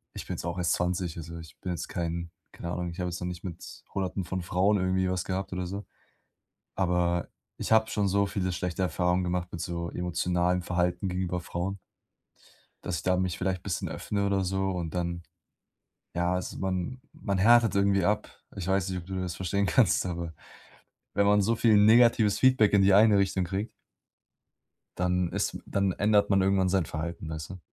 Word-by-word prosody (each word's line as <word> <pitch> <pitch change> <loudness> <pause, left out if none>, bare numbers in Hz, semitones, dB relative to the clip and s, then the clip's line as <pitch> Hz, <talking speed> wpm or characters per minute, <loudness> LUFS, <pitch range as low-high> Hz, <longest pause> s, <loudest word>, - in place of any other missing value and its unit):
ich - - -6
bin - - -4
jetzt - - -6
auch 85 +1 -3
erst 90 -1 +1
20. 90 -1 -1
Also 85 +1 -7
ich 80 -3 -12
bin 90 - -3
jetzt 85 - -4
kein 85 -1 -3 0.2
keine 85 - -6
Ahnung, 90 0 -3
ich 85 +2 -9
habe 90 0 -1
jetzt 85 - -5
noch 90 - -3
nicht 90 -1 -6
mit 85 -3 -8
Hunderten 95 0 -2
von 95 +2 -3
Frauen 95 +4 +2
irgendwie 95 0 +1
was 90 -1 -1
gehabt 95 0 -3
oder 90 0 -2
so. 100 +3 -5 0.9
Aber 90 -2 +1 0.3
ich - - -5
habe 110 0 +5
schon 100 -2 +1
so 100 +1 +2
viele 95 -2 -2
schlechte 90 0 -3
Erfahrungen 90 +1 +1
gemacht 90 0 -1
mit 85 - -5
so 85 -1 -3
emotionalem 90 0 0
Verhalten 90 +1 0
gegenüber 90 -1 -2
Frauen 90 +3 -4 1.1
dass 80 - -2
ich - - -6
da 90 0 +2
mich 90 -2 -1
vielleicht 90 -1 -2
bisschen 95 -4 -2
öffne 100 -1 -2
oder 100 -1 +1
so 95 +1 0
und 85 -3 -4
dann 85 -1 -2 0.9
ja, 85 +1 +1
also 90 - -4
man 95 +6 -2
man 100 -2 -2
härtet 115 +1 +5
irgendwie 100 -2 +3
ab. 105 +2 0 0.3
Ich 95 -3 -5
weiß 95 0 +1
nicht, 95 -1 -2
ob 85 - -11
du 95 -1 -3
das 90 -2 -3
verstehen 100 +3 0
kannst, 95 +1 +3
aber 85 -2 -4 0.8
wenn 100 - +3
man 105 0 +5
so 115 +3 +1
viel 110 -2 +4
negatives 110 -1 +5
Feedback 130 -6 +4
in 100 -1 +5
die 95 0 +5
eine 105 0 +6
Richtung 95 -1 +1
kriegt 95 +5 -3 1.3
dann 90 0 +1
ist - - -1
dann 100 -1 0
ändert 105 0 +3
man 95 -1 +4
irgendwann 95 -1 +2
sein 95 -4 +2
Verhalten, 80 +1 -5
weißt 80 +1 -6
du. 95 - -9
90 Hz, 195 wpm, -28 LUFS, 85-100 Hz, 1.3 s, eine